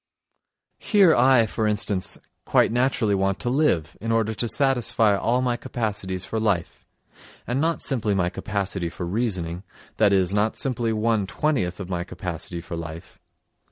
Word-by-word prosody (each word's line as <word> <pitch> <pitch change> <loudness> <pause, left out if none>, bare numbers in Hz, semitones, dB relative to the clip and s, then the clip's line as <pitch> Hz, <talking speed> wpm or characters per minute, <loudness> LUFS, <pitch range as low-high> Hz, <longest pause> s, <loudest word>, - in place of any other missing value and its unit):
Here 200 -6 +4
I, 125 -1 +5
for 110 0 -1
instance, 105 -3 -1 0.3
quite - - +3
naturally 120 -3 +1
want 95 0 +1
to 120 - 0
live, 95 - +1
in 115 +1 -2
order 110 -1 +1
to 120 +2 -2
satisfy 115 -4 +2
all 120 +5 +1
my 120 -1 0
capacities 100 -7 -3
for 110 - -3
life, 100 -6 -1 0.6
and 125 +3 -1
not 165 +1 0
simply 110 -7 +1
my 90 -2 +1
capacity 95 -2 -3
for 90 - -6
reasoning, 90 -4 -1 0.4
that 105 -2 +4
is, 95 -1 +2
not 105 +2 +1
simply 120 -4 -1
one 110 -2 +1
twentieth 100 - -1
of 95 - -5
my 90 -1 -2
capacity 90 -1 -5
for 85 - -7
life. 85 +1 -8
105 Hz, 160 wpm, -24 LUFS, 95-120 Hz, 0.6 s, I